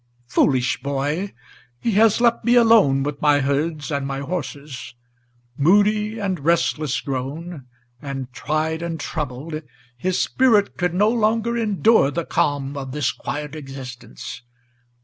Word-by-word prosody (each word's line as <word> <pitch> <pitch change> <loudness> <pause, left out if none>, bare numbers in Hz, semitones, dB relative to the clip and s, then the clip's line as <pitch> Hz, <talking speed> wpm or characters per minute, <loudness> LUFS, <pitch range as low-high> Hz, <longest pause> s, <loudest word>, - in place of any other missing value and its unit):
Foolish 125 +1 +1
boy! 145 +8 -2 0.5
he 230 - 0
has 215 +1 +4
left 235 -1 +3
me 240 +1 +4
alone 220 - +5
with 145 0 -4
my 145 -1 +4
herds 150 +3 -1
and 140 -1 -1
my 135 0 -3
horses. 140 -4 -6 0.6
Moody 210 +7 +3
and 195 -5 -2
restless 155 -2 +1
grown, 140 +3 -5 0.3
and 135 -3 -6
tried 155 +3 -1
and 170 -2 -4
troubled, 155 +1 -4 0.3
his 180 +8 -1
spirit 225 -6 +3
Could 180 -1 -1
no 205 +3 +4
longer 230 0 +1
endure 220 -6 +3
the 165 +3 -3
calm 145 -1 0
of 135 -2 -5
this 145 -4 0
quiet 150 0 -5
existence. 135 -2 -8
150 Hz, 130 wpm, -22 LUFS, 135-200 Hz, 0.6 s, alone